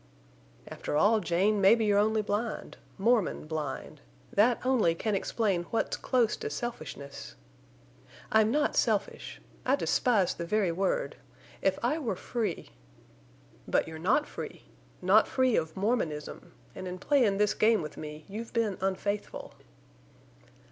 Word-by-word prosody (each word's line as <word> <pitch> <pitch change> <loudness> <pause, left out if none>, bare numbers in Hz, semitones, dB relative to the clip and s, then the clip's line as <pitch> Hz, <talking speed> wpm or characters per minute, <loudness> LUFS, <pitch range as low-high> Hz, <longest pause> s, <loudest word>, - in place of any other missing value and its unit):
"After 150 - -3
all, 215 +7 +4
Jane, 195 +3 +1
mebbe 205 +5 +6
you're 205 -2 +3
only 215 +1 +2
blind—Mormon 215 0 -1
blind. 155 -3 -5 0.3
That 230 +4 +4
only 235 -11 +3
can 215 +5 -2
explain 195 -3 0
what's 225 - -1
close 245 -4 +1
to - - -4
selfishness—" 145 - -6 1.0
"I'm 220 0 +4
not 295 +5 +1
selfish. - - 0 0.2
I 260 - +3
despise 230 -8 +2
the 170 - -5
very 205 -2 +1
word. 195 - -1 0.4
If 190 -1 +2
I 285 +7 +1
were 235 -10 -2
free—" 230 +4 -3 1.0
"But - - +1
you're 160 0 -7
not 215 - +2
free. - - -8 0.4
Not - - +5
free 260 -2 +2
of 160 +2 -1
Mormonism. 175 -6 -2 0.2
An' 185 - -7
in 180 0 -5
playin' 235 -3 +2
this 210 0 +2
game 220 -4 +3
with 150 - -7
me 150 0 -8
you've 220 +3 -7
been 225 -5 0
unfaithful." 195 +2 -3
210 Hz, 135 wpm, -29 LUFS, 175-230 Hz, 1.0 s, mebbe